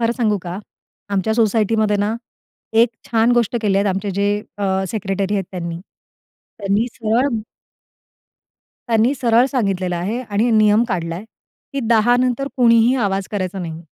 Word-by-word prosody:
खरं 230 Hz, 0 st, +2 dB
सांगू 215 Hz, -4 st, +1 dB
का? 180 Hz, +1 st, -5 dB, 0.5 s
आमच्या 200 Hz, +2 st, 0 dB
सोसायटी 225 Hz, -1 st, +2 dB
मध्ये 210 Hz, -1 st, +2 dB
ना, 205 Hz, +2 st, 0 dB, 0.6 s
एक 230 Hz, +2 st, +5 dB, 0.2 s
छान 230 Hz, +1 st, +3 dB
गोष्ट 240 Hz, -1 st, +1 dB
केल्या 200 Hz, -1 st, +2 dB
आहेत 205 Hz, -, +1 dB
आमचे 195 Hz, +1 st, -3 dB
जे 205 Hz, +2 st, 0 dB, 0.2 s
अ, 190 Hz, -1 st, 0 dB
सेक्रेटरी 195 Hz, -1 st, -2 dB
आहेत 195 Hz, -, -1 dB
त्यांनी. 170 Hz, -2 st, -4 dB, 0.8 s
त्यांनी 205 Hz, +3 st, +1 dB
सरळ 230 Hz, +4 st, +1 dB, 1.6 s
त्यांनी 230 Hz, +3 st, +3 dB
सरळ 235 Hz, +1 st, +4 dB
सांगितलेलं 195 Hz, -8 st, -1 dB
आहे 195 Hz, +8 st, -2 dB
आणि 215 Hz, +4 st, +1 dB
नियम 215 Hz, 0 st, +4 dB
काढलाय 170 Hz, -1 st, -3 dB, 0.5 s
की 275 Hz, -, -1 dB
10:00 235 Hz, +1 st, +4 dB
नंतर 255 Hz, +2 st, 0 dB
कुणीही 235 Hz, 0 st, +5 dB
आवाज 195 Hz, -5 st, -1 dB
करायचा 190 Hz, -1 st, -3 dB
नाही. 165 Hz, -2 st, -6 dB
210 Hz, 145 wpm, -19 LUFS, 195-230 Hz, 1.6 s, एक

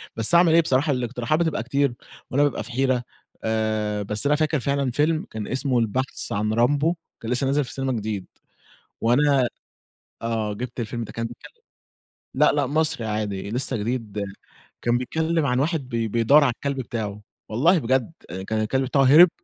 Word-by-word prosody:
بس 115 Hz, +8 st, +3 dB
أعمل 170 Hz, -1 st, +6 dB
إيه 170 Hz, -, +7 dB
بصراحة 145 Hz, -1 st, +1 dB
الاقتراحات 125 Hz, +3 st, -1 dB
بتبقى 160 Hz, -9 st, 0 dB
كتير 140 Hz, +1 st, +1 dB, 0.4 s
وأنا 140 Hz, +3 st, +3 dB
بابقى 145 Hz, -6 st, 0 dB
في 120 Hz, -, -7 dB
حيرة، 130 Hz, 0 st, +1 dB, 0.4 s
آآ 110 Hz, -1 st, -1 dB
بس 105 Hz, +5 st, 0 dB
أنا 145 Hz, -, +4 dB
فاكر 155 Hz, 0 st, +1 dB
فعلًا 140 Hz, 0 st, 0 dB
فيلم 155 Hz, +5 st, +1 dB
كان 110 Hz, -2 st, -5 dB
اسمه 130 Hz, -1 st, +1 dB
البحث 125 Hz, +4 st, -1 dB
عن 105 Hz, +1 st, 0 dB
رامبو 145 Hz, +8 st, +2 dB, 0.3 s
كان 115 Hz, -, -4 dB
لسّه 125 Hz, +2 st, +1 dB
نازل 145 Hz, +2 st, +2 dB
في 125 Hz, -, -8 dB
السينما 135 Hz, +1 st, -2 dB
جديد 105 Hz, -4 st, -3 dB, 0.8 s
وأنا 135 Hz, +2 st, +3 dB, 0.7 s
آه، 110 Hz, -2 st, -1 dB
جِبت 125 Hz, +4 st, -6 dB
الفيلم 120 Hz, +1 st, -3 dB
ده -, -, -8 dB
كان 115 Hz, -, -3 dB
كان 120 Hz, +1 st, -13 dB, 0.9 s
لأ، -, -, +4 dB
لأ 145 Hz, -1 st, +1 dB
مصري 150 Hz, -3 st, 0 dB
عادي 105 Hz, -2 st, -3 dB
لسّه 125 Hz, +1 st, +1 dB
جديد 105 Hz, -2 st, -3 dB, 0.6 s
كان 120 Hz, 0 st, +2 dB
بيتكلِّم 160 Hz, +5 st, 0 dB
عن 125 Hz, -2 st, +1 dB
واحد 145 Hz, -2 st, -1 dB
بي 115 Hz, -2 st, -1 dB
بيدوّر 120 Hz, +7 st, +4 dB
على 130 Hz, -4 st, +2 dB
الكلب 140 Hz, -1 st, -3 dB
بتاعه، 105 Hz, -4 st, -5 dB, 0.3 s
والله 165 Hz, -, +3 dB
بجد 130 Hz, +1 st, 0 dB, 0.4 s
كان 110 Hz, 0 st, 0 dB
الكلب 130 Hz, +5 st, 0 dB
بتاعه 135 Hz, +2 st, +2 dB
هرب 155 Hz, +7 st, +8 dB
125 Hz, 175 wpm, -24 LUFS, 110-145 Hz, 0.9 s, هرب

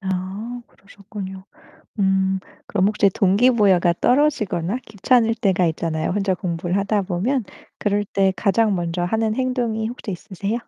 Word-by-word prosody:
아, 195 Hz, +5 st, -4 dB
그러셨군요. 195 Hz, -1 st, -10 dB, 0.6 s
음. 190 Hz, 0 st, +2 dB, 0.3 s
그럼 195 Hz, -2 st, +2 dB
혹시 205 Hz, -1 st, +3 dB
동기부여가 195 Hz, -3 st, +3 dB
떨어지거나 245 Hz, -, +1 dB
귀찮을 225 Hz, +2 st, +2 dB
때가 190 Hz, -5 st, +1 dB
있잖아요 160 Hz, -1 st, -2 dB
혼자 195 Hz, 0 st, 0 dB
공부를 175 Hz, 0 st, -2 dB
하다 200 Hz, 0 st, 0 dB
보면. 210 Hz, +8 st, -1 dB, 0.3 s
그럴 205 Hz, 0 st, 0 dB
때 195 Hz, -1 st, +1 dB
가장 215 Hz, +1 st, +2 dB
먼저 175 Hz, 0 st, -2 dB
하는 220 Hz, +4 st, 0 dB
행동이 245 Hz, -4 st, -1 dB
혹시 230 Hz, -3 st, -6 dB
있으세요? 200 Hz, +2 st, -4 dB
200 Hz, 320 characters per minute, -21 LUFS, 185-220 Hz, 0.6 s, 혹시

